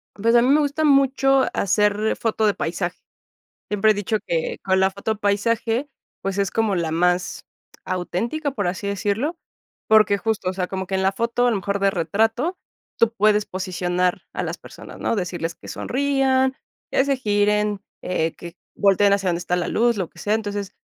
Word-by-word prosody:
Pues 230 +3 +2
a 235 - +7
mí 245 - +2
me 295 +2 +5
gusta 290 +2 -1
mucho 270 -1 +4
hacer 210 +2 +1
foto 220 -1 0
de 205 - +3
paisaje. 175 0 -3 0.7
Siempre 210 +1 +3
he - - +3
dicho 205 +2 -1
que 165 -1 -1
con 190 0 +2
la 190 0 +3
foto 205 +3 -3
paisaje, 225 +6 0 0.3
pues 195 0 -3
es 200 -1 0
como 220 -3 +1
la 170 -3 -1
más 180 +2 0 0.4
auténtica, 230 - -2
por 205 -8 -2
así 190 +3 -3
decirlo, 210 - -1 0.5
porque 215 -2 +5
justo, 215 -5 -1
o - - -3
sea, 185 -1 -2
como 190 0 -4
que 190 - -2
en 190 - 0
la 190 - +3
foto, 235 +3 0
a - - +4
lo 215 - +1
mejor 200 +2 -2
de 195 0 +3
retrato, 225 - 0 0.4
tú 230 0 +3
puedes 210 -1 +3
posicionar 180 -1 -1
a - - -2
las - - -4
personas, - - -12
¿no? - - 0
Decirles 175 -4 -3
que - - -14
sonrían, 265 -1 +1 0.4
que - - +3
se 275 -1 +1
giren, 210 -2 +1 0.2
eh, 165 -3 -1
que 170 -1 -10 0.2
volteen 200 0 +4
hacia 195 -2 +1
dónde 170 -1 0
está 175 0 -1
la 175 - -1
luz, 235 -1 +2
lo 185 -4 -2
que - - -17
sea. 210 - 0
Entonces, 205 -2 -4
205 Hz, 190 wpm, -22 LUFS, 190-230 Hz, 0.7 s, a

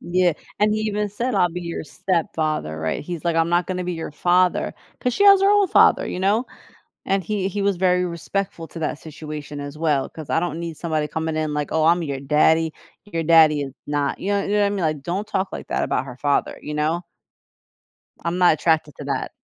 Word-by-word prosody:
Yeah, 180 0 +2 0.3
and 210 +1 +3
he 215 - 0
even 210 -1 -1
said, 240 +5 -2
"I'll 175 - +3
be 180 +2 -5
your 170 -2 -5
stepfather," 155 - -2
right, 80 0 -2
he's 170 -1 -6
like, 170 -1 +1
"I'm 165 0 +3
not 175 0 +2
gonna 180 -1 -3
be 180 - -2
your 165 -1 -5
father," 180 +4 +2 0.2
'cause 250 - -1
she 405 - +2
has 395 -1 +8
her 395 - +5
own 410 -2 +4
father, - - +5
you - - -4
know, 205 +6 +1 0.6
and 195 -1 +1
he 200 0 -1
he 200 +1 -3
was 200 -2 +1
very 180 0 +2
respectful 175 0 -4
to 170 - -8
that 155 - -2
situation 150 -2 -8
as 145 +1 -7
well, 150 -4 +1
'cause 155 -3 -10
I 160 - +2
don't 170 -2 -3
need 170 -1 -5
somebody 155 -2 -1
coming 160 +1 -3
in 155 -1 -1
like, 150 -1 -2
"Oh, 160 -1 +2
I'm 170 +1 +4
your 140 -3 -3
daddy, 155 +3 +3 0.3
your 165 -5 -3
daddy 155 -2 +6
is 135 -2 -5
not" 145 -1 -1
you 200 - -2
know 200 0 +1
you - - -4
know 210 - +3
what 205 - +4
I - - +2
mean, 200 -1 -2
like 155 -3 -1
"Don't 190 +7 -3
talk 195 -2 -1
like - - -6
that - - -1
about - - -1
her 125 -2 -9
father," 145 +1 0
you 150 - -6
know. 155 +4 0 1.2
I'm 170 +1 -1
not 180 -3 +6
attracted 155 -2 +1
to - - -7
that. - - -2
170 Hz, 230 wpm, -22 LUFS, 155-190 Hz, 1.2 s, has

